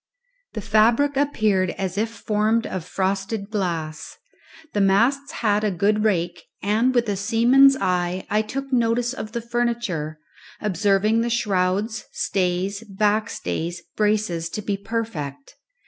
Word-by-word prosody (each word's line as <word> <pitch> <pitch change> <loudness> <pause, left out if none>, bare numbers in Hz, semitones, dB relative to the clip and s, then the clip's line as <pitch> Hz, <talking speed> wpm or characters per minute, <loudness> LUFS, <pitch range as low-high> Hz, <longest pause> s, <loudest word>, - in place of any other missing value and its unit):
The 215 - -4
fabric 230 +8 +3
appeared 215 -10 +1
as 190 -2 -3
if 220 +2 0
formed 220 0 0
of 185 -3 -4
frosted 195 +3 -2
glass. 165 -7 -3 0.6
The 205 - +1
masts 240 +9 +2
had 210 0 +3
a 210 - +2
good 205 +3 +1
rake, 175 -4 0 0.2
and 225 +6 +2
with 240 -1 +2
a 205 - 0
seaman's 240 +7 +5
eye 180 0 0
I 210 +1 +2
took 270 +5 -5
notice 240 0 +2
of 220 -4 -7
the 235 - -2
furniture, 235 -10 -2 0.4
observing 210 +2 +2
the 235 - 0
shrouds, 210 -1 0
stays, 190 +2 -1
backstays, 190 - -1
braces 210 -6 0
to 210 - -5
be 200 -1 -1
perfect. 195 -10 -5
210 Hz, 130 wpm, -23 LUFS, 185-230 Hz, 0.6 s, seaman's